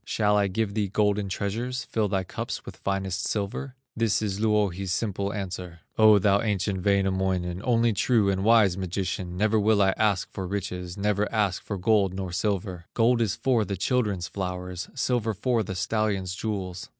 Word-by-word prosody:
Shall 105 -1 +1
I 100 -1 +3
give 100 +2 -1
thee 105 -1 0
golden 105 0 +1
treasures, 120 +7 -2
Fill 110 -2 -1
thy 95 -1 0
cups 90 - -5
with - - -9
finest 95 -2 -2
silver?" 110 +6 -3 0.2
This 115 -2 +2
is 100 -2 -2
Louhi's 100 -4 +1
simple 100 -1 -1
answer: 90 -4 -6
"O 110 -1 +7
thou 100 0 +3
ancient 100 -3 -1
Wainamoinen, 95 -2 +1
Only 115 -2 +3
true 110 0 +2
and 95 -1 0
wise 110 -4 +5
magician, 95 0 -3
Never 110 +2 +2
will 105 0 +3
I 95 -1 +4
ask 105 -4 +1
for 95 -1 -5
riches, 90 -1 -4
Never 105 +1 0
ask 105 -5 0
for 100 - -5
gold 95 0 +2
nor 95 -2 -4
silver; 95 -2 -2
Gold 120 +1 +3
is 110 -2 +1
for 115 0 +2
the 100 -2 -4
children's 100 -4 0
flowers, 90 -1 -5
Silver 120 -5 0
for 120 +3 +1
the 95 -2 -4
stallion's 100 -2 -1
jewels. 95 -3 -4
100 Hz, 175 wpm, -26 LUFS, 95-110 Hz, 0.2 s, O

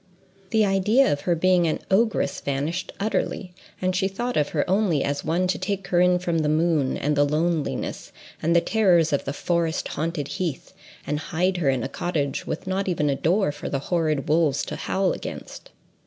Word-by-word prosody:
The 220 +1 +3
idea 205 +7 +3
of 145 - -4
her 175 - +1
being 180 0 +3
an 155 - 0
ogress 220 +3 +1
vanished 145 +6 -2
utterly, 200 -3 -2 0.3
and 185 0 0
she 190 +1 +1
thought 240 +6 -3
of 150 -1 +1
her 150 - -1
only 185 -6 +2
as 140 0 -2
one 170 +4 +1
to 185 - -1
take 200 -2 -3
her 175 -1 +3
in 180 0 +4
from 175 -2 -1
the 150 -1 +1
moon, 155 -3 +1
and 150 +1 0
the 145 - +4
loneliness, 155 +2 -1 0.3
and 170 +2 +2
the 170 - +6
terrors 175 -8 +3
of 140 - 0
the 140 - -2
forest 165 +1 -1
haunted 155 -2 -3
heath, 175 -7 -4 0.3
and 150 +1 -1
hide 180 +4 0
her 155 -6 +1
in 130 -3 0
a - - -1
cottage 145 -2 -2
with - - -4
not 190 +1 -1
even 150 -5 +1
a - - 0
door 175 +4 +1
for 145 - -6
the 140 - -1 0.2
horrid 155 -5 +1
wolves 155 -3 +2
to - - -5
howl 190 -1 0
against. - - -8
170 Hz, 200 wpm, -24 LUFS, 150-185 Hz, 0.3 s, the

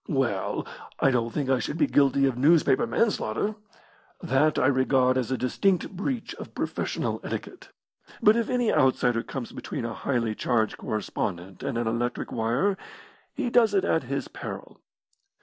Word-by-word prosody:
"Well, 130 - -1 0.3
I 135 - +4
don't 120 -2 +1
think 145 0 -2
I 130 -1 +2
should 150 - -3
be 155 - +4
guilty 140 -1 +3
of 135 -3 +1
newspaper 145 - +4
man 230 -1 +2
slaughter. 160 - -2 0.7
That 155 -3 +2
I - - +3
regard 130 -1 +3
as 130 -3 -1
a 130 - 0
distinct 180 - +1
breach 230 +5 -3
of - - -9
professional - - -2
etiquette. - - -6 0.5
But 215 -1 +5
if 235 -1 0
any 245 -3 +1
outsider 125 -4 +3
comes 125 -1 -6
between 115 - -5
a 115 - -3
highly 115 -3 -1
charged 110 -1 0
correspondent 95 -3 -4
and 120 - -2
an 120 - 0
electric 120 +2 -2
wire, 120 - 0 0.6
he 250 -5 -2
does 235 - +4
it 390 - +2
at - - +2
his - - -3
peril. - - -8
130 Hz, 165 wpm, -26 LUFS, 120-175 Hz, 0.7 s, But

